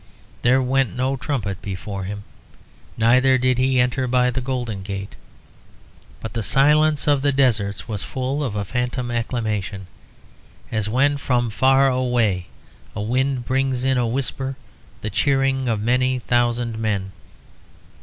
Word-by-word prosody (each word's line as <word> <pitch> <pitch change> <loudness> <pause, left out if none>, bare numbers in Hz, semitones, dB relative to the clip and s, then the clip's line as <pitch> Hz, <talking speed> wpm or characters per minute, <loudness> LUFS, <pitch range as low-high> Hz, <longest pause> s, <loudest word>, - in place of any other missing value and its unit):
There 130 +2 +3
went 130 -4 +1
no 130 +2 0
trumpet 115 - -3
before 95 0 -5
him, 100 +1 -6 0.7
neither 130 +4 +4
did 130 0 +1
he 130 0 +2
enter 125 +1 +1
by 125 0 +2
the 130 +2 -2
Golden 120 -6 -3
Gate; 100 0 -6 1.1
but 110 -2 -6
the 115 - -2
silence 150 +5 +3
of 145 -2 +3
the 145 0 +2
deserts 115 -7 +1
was 105 -4 -3
full 135 +3 -3
of 120 -7 -3
a 100 -1 -2
phantom 125 +2 -2
acclamation, 110 -5 -2 0.9
as 110 -2 -1
when 140 +5 +2
from 120 -4 0
far 135 +4 +4
away 120 -8 +1 0.5
a 105 - -3
wind 130 +2 0
brings 130 -1 0
in 130 -1 +2
a 120 - +1
whisper 135 +2 -2 0.5
the 110 - -3
cheering 135 -2 +1
of 115 -3 0
many 125 +3 +1
thousand 120 -2 0
men. 100 -3 -1
125 Hz, 145 wpm, -22 LUFS, 110-130 Hz, 1.1 s, neither